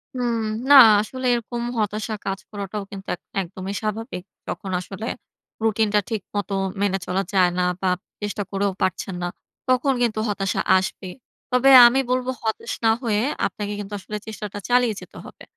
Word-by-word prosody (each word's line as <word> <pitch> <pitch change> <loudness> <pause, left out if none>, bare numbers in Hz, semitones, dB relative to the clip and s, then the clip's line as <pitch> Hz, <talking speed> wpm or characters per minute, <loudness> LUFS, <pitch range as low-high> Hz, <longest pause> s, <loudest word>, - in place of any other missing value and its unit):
হুম। 240 -2 0 0.3
না - - +8 0.3
আসলে 255 +4 -6
এরকম 235 0 -4 0.2
হতাশা 215 +1 -2
কাজ 195 0 -2
করাটাও 205 0 -5
কিন্তু 195 -1 -9
এক 180 - -29 0.2
একদমই 190 +2 -6
স্বাভাবিক। 215 -2 -4 0.2
তখন 190 - -5
আসলে 195 +4 -7 0.6
রুটিনটা 215 -1 +2
ঠিক 220 -3 -2
মত 205 0 -2 0.3
মেনে 200 -1 +2
চলা 190 +2 0
যায় 185 -2 +5
না - - +2 0.2
বা, 190 - 0 0.3
চেষ্টা 205 0 -3
করেও 200 0 0
পারছেন 185 0 -1
না। - - 0 0.4
তখন 255 +2 +3
কিন্তু 225 -3 +1
হতাশা 195 -2 -1 0.2
আসবে। 190 0 -3 0.4
তবে 250 +2 +4 0.2
আমি 250 +3 +2
বলবো 255 0 0
হতাশ 220 -1 -2
না 225 - +6
হয়ে 215 -3 +1 0.2
আপনাকে 205 0 -3
কিন্তু 205 0 -7
আসলে 210 +2 -6
চেষ্টাটা 210 -2 -6
চালিয়ে 245 -2 +3
যেতে - - -13
হবে। - - -13
210 Hz, 160 wpm, -23 LUFS, 195-230 Hz, 0.6 s, না